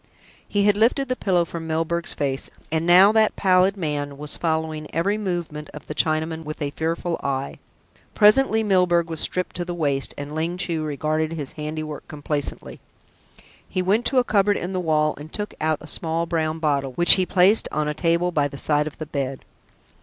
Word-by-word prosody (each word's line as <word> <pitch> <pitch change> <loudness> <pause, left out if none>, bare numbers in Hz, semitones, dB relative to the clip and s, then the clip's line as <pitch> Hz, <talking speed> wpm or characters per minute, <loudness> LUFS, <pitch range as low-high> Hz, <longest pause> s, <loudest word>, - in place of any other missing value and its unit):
He 205 -1 +1
had 205 0 +3
lifted 250 +5 +2
the 255 - 0
pillow 180 -7 +1
from 165 -1 -7
Milburgh's 165 +2 -2
face, 135 -1 -1 0.2
and 160 +1 0
now 185 +4 +7
that 220 -1 +3
pallid 185 +1 +3
man 145 -4 -3
was 150 +1 -3
following 160 -2 -2
every 190 +5 +1
movement 175 -7 -4
of 150 - -10
the - - -6
Chinaman 160 +1 0
with 155 0 -7
a 145 -2 -2
fearful 165 +2 -2
eye. 135 0 -3 0.6
Presently 220 +1 +4
Milburgh 180 -4 +2
was 160 - -3
stripped 180 0 -1
to 175 - -1
the 175 0 -5
waist, 140 -5 -1
and 145 +1 -6
Ling 165 +3 -2
Chu 170 -3 -2
regarded 155 +2 -1
his 145 -5 -4
handiwork 155 -1 -6
complacently. 145 -1 -4 0.9
He 185 - -1
went 210 +6 +2
to 265 - 0
a 250 - +5
cupboard 205 -3 +2
in 180 +2 -4
the 185 - -1
wall, 155 -3 +1
and 155 +2 -10
took 210 -1 -4
out 155 0 +1
a 155 - -11
small 165 +1 -1
brown 160 -1 -1
bottle, 140 -4 -1
which 175 +6 +6
he 185 - +2
placed 195 +3 +4
on 150 0 -1
a 150 - -1
table 170 +3 +1
by 145 -4 +1
the 140 - -10
side 150 +1 +1
of 155 - -8
the 155 - -5
bed. 135 -3 -4
160 Hz, 195 wpm, -23 LUFS, 150-180 Hz, 0.9 s, now